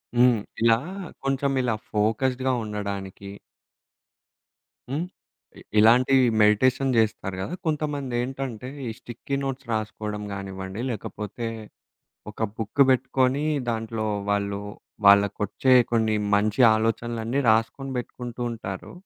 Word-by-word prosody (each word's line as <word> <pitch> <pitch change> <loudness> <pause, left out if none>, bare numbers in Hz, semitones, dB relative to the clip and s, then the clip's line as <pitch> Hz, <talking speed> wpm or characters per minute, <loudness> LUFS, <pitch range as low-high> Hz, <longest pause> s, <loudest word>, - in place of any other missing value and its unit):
హ్మ్. 120 -1 +5 0.2
ఇలా 115 0 +5 0.5
కొంచెం 135 0 0
ఇలా 125 -3 0 0.2
ఫోకస్డ్‌గా 125 +5 +1
ఉండడానికి 100 -2 -5 1.6
హ్మ్. 160 +6 -2 0.5
ఇ - - -13 0.2
ఇలాంటివి 125 +4 +5 0.2
మెడిటేషన్ 130 +6 +3
చేస్తారు 105 -4 0
కదా! 160 - -4
కొంతమందేంటంటే 135 -5 -2 0.2
ఈ - - -2
స్టిక్కీ 120 +3 -5
నోట్స్ 135 0 -4
రాసుకోవడం 110 -1 -3
కానివ్వండి 95 +1 -6
లేకపోతే, 110 +1 -5 0.8
ఒక 105 - -15 0.2
బుక్కు 110 +5 +2
పెట్టుకొని 130 +2 +2 0.3
దాంట్లో 110 -1 -3 0.2
వాళ్ళు 100 0 -1 0.5
వాళ్ళకొచ్చే 100 +5 +4 0.2
కొన్ని 110 -2 +2 0.2
మంచి 105 +3 +1
ఆలోచనలన్నీ 115 +3 -1
రాసుకొని 115 +5 0
పెట్టుకుంటూ 120 0 -7
ఉంటారు. 95 -5 -6
115 Hz, 100 wpm, -25 LUFS, 105-130 Hz, 1.6 s, హ్మ్